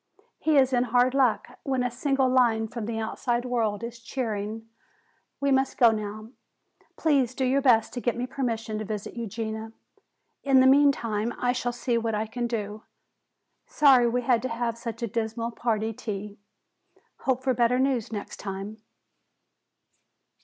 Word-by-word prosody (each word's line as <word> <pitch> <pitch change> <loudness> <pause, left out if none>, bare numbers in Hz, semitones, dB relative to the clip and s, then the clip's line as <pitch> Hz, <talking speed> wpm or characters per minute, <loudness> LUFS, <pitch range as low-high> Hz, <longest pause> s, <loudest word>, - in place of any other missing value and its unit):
He 310 -2 +2
is 260 -1 +4
in 245 0 +3
hard 245 +2 +3
luck, 260 -5 +1
when 265 -2 -1
a 245 - -1
single 270 +2 +1
line 240 -4 +3
from 220 -1 -6
the 230 -1 -3
outside 240 +2 -2
world 230 -4 -1
is 235 0 -6
cheering. 225 -3 -4 0.7
We 280 0 +1
must 265 0 +1
go 235 -2 +6
now. 215 0 -5 0.7
Please 270 -6 +2
do 265 - 0
your 270 +2 +2
best 235 -5 +3
to 245 - -4
get 240 -1 -1
me 245 - -1
permission 230 -4 -3
to - - -3
visit 210 -1 -5
Eugenia. 220 -1 -5 0.7
In 270 -2 +5
the 260 - +6
meantime 250 -5 +3
I 245 - +1
shall 245 -1 -2
see 240 -1 -1
what 225 -1 -1
I 215 +1 -1
can 240 +2 -3
do. 215 -2 -4 0.9
Sorry 260 -5 +5
we 245 +1 -1
had 240 -2 +2
to 255 - -3
have 230 0 -2
such 235 0 -6
a - - 0
dismal 230 +1 -3
party 225 -1 -1
tea. 205 -1 -6 0.8
Hope 260 -1 -1
for 260 -1 +2
better 240 +1 +2
news 260 -4 0
next 205 -2 -6
time." 200 +2 -6
235 Hz, 165 wpm, -26 LUFS, 220-255 Hz, 0.9 s, go